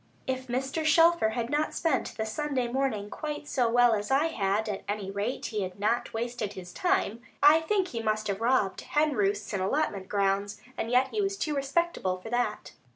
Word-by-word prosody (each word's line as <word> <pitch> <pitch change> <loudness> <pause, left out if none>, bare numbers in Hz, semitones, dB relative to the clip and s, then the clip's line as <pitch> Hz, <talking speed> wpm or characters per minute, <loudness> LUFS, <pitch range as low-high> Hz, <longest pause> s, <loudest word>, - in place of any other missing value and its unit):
If 260 0 -3
Mr. 265 +5 -2
Shelfer 330 -4 +5
had 235 +1 -2
not 300 +1 0
spent 315 -6 0
the 220 - -1
Sunday 260 +2 -1
morning 240 -5 -1
quite 300 -1 -5
so 245 -5 +1
well 245 0 +5
as 210 -1 -2
I 285 +5 +3
had, 205 -4 0
at 205 -2 -3
any 205 -2 -3
rate 205 +6 -3
he 215 -2 -2
had 185 0 -5
not 225 +4 0
wasted 230 -2 -3
his 180 -3 -9
time. 360 - 0 0.2
I 300 +2 +8
think 380 +3 0
he 230 - -4
must 215 -1 0
have 200 +1 -2
robbed 235 -5 +2
hen 300 0 +1
roosts 205 -1 0
and 195 - -1
allotment 195 -3 -1
grounds; 200 0 0 0.2
and 225 - -3
yet 255 +2 +3
he 425 - -1
was 395 0 -1
too 305 -5 -1
respectable 275 - 0
for 205 +5 -10
that. 245 0 -1
240 Hz, 200 wpm, -28 LUFS, 205-295 Hz, 0.2 s, I